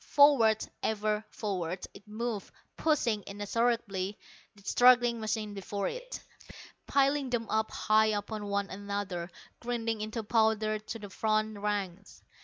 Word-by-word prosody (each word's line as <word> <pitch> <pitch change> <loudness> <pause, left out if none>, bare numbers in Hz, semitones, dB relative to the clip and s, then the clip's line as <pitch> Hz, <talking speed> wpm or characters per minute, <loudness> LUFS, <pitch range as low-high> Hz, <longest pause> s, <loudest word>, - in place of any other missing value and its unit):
Forward, 260 -7 +6 0.2
ever 215 0 0
forward, 185 -4 -3
it 200 +2 -15
moved, 220 -1 -4 0.2
pushing 240 -9 +1
inexorably 205 -1 -1 0.4
the 200 - -18
struggling 245 +1 +5
machines 215 -1 -2
before 200 0 -3
it, - - -6 0.7
piling 275 0 +2
them 235 -2 -1
up 220 0 +1
high 215 0 +3
upon 210 0 -2
one 200 0 -1
another, 200 -3 -4 0.3
grinding 230 -2 -2
into 220 +1 -3
powder 220 -1 +2
the 215 -1 -7
front 215 0 0
ranks. 200 -2 -3
215 Hz, 120 wpm, -30 LUFS, 205-230 Hz, 0.7 s, Forward